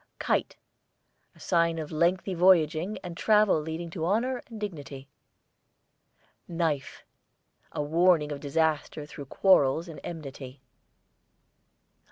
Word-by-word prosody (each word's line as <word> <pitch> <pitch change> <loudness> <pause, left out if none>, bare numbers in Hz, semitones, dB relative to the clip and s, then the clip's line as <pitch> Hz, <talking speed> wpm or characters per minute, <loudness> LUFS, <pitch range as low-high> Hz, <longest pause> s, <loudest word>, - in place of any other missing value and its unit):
KITE, - - -1 0.8
a - - -20
sign 170 -1 +1
of 155 -2 -5
lengthy 175 +4 +1
voyaging 175 +1 +3
and 175 -2 -7
travel 210 -4 +3
leading 160 +2 -5
to 165 -1 -5
honour 235 +8 0
and 225 -3 -9
dignity. 145 -9 -7 1.4
KNIFE, 165 -5 -2 0.7
a 150 - -3
warning 160 0 +3
of 145 - -4
disaster 155 0 -1
through 145 -1 -9
quarrels 160 0 +3
and 165 - -9
enmity. 140 -5 -8
165 Hz, 110 wpm, -28 LUFS, 150-180 Hz, 1.4 s, voyaging